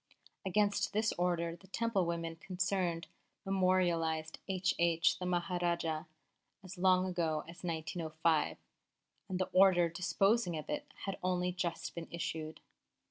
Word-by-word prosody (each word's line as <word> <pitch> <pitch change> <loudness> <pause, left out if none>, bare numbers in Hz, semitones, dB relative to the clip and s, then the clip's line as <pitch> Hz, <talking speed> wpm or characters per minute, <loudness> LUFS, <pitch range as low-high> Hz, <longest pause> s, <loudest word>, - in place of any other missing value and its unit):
Against 205 +1 +1
this 215 +1 +2
order 170 -1 0
the 190 +3 -18
Temple 200 -3 0
women 165 -1 -2
concerned 180 -2 -1 0.4
memorialised 175 -4 +1
H.H. 170 -3 +2
the 180 - -3
Maharajah 175 -2 0 0.6
as 185 -1 -9
long 185 0 +4
ago 165 -4 0
as 170 +2 -11
1905, 160 -1 0 0.7
and 185 - -1
the 185 0 -1
order 185 -3 +6
disposing 180 +2 +1
of 155 - -6
it 150 - -4
has 195 - -1
only 180 0 +1
just 175 -2 -3
been 170 -1 -6
issued. 160 -2 -4
175 Hz, 125 wpm, -34 LUFS, 165-185 Hz, 0.7 s, order